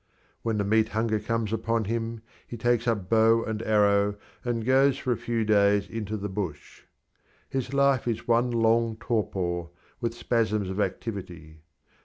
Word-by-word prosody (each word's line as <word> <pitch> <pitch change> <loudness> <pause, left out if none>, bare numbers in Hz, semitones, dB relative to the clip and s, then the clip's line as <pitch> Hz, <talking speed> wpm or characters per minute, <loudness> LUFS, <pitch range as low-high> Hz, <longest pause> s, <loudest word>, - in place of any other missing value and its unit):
When 115 -2 -1
the 100 - +1
meat 110 +2 +2
hunger 110 -1 +1
comes 115 -1 -2
upon 115 +1 0
him 115 +1 -3 0.2
he 120 - -7
takes 120 +1 +1
up 105 -6 0
bow 115 +1 +4
and 110 -1 -3
arrow 105 -2 +3 0.3
and 115 -2 -2
goes 135 +1 +4
for 130 - -2
a - - +2
few 115 -2 -2
days 100 -1 +3
into 110 -1 -4
the 105 0 -4
bush. 95 -7 -6 0.7
His 135 -1 -2
life 140 -2 +2
is 115 -1 -2
one 120 +1 +3
long 115 -1 +2
torpor, 90 -6 -2 0.3
with 115 -1 -2
spasms 110 -5 0
of 95 - -4
activity. 85 -9 -5
110 Hz, 160 wpm, -27 LUFS, 100-115 Hz, 0.7 s, bow